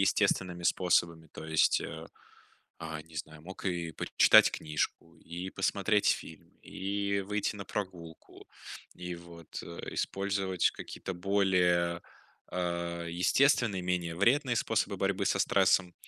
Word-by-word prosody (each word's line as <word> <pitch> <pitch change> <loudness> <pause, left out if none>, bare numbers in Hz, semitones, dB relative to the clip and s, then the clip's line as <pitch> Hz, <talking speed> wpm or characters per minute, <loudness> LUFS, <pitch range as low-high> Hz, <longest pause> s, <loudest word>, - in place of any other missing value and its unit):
естественными 90 -2 +1
способами, 85 -2 +1
то - - -9
есть, 80 -1 +3
э, - - -7 0.8
а, 80 -1 -5
не 80 0 -19
знаю, 80 0 -7
мог 95 +3 -10
и 85 -3 -2
пр - - -5
читать - - +8
книжку, 80 +2 -3
и 85 +3 -7
посмотреть 100 +2 +1
фильм, - - -3
и 100 +1 -2
выйти 105 +1 -2
на 100 - -6
прогулку, 90 -6 -7 0.5
и, 90 0 -6
вот, 85 -1 -10
э, 85 - -8
использовать 95 -2 0
какие-то 95 - -7
более, 90 -2 +2 0.5
э, 85 -1 -2
естественные, 100 - +3
менее 90 -2 -2
вредные 120 - +3
способы - - 0
борьбы - - 0
со - - +1
стрессом. 95 -2 +3
90 Hz, 125 wpm, -30 LUFS, 85-100 Hz, 0.8 s, читать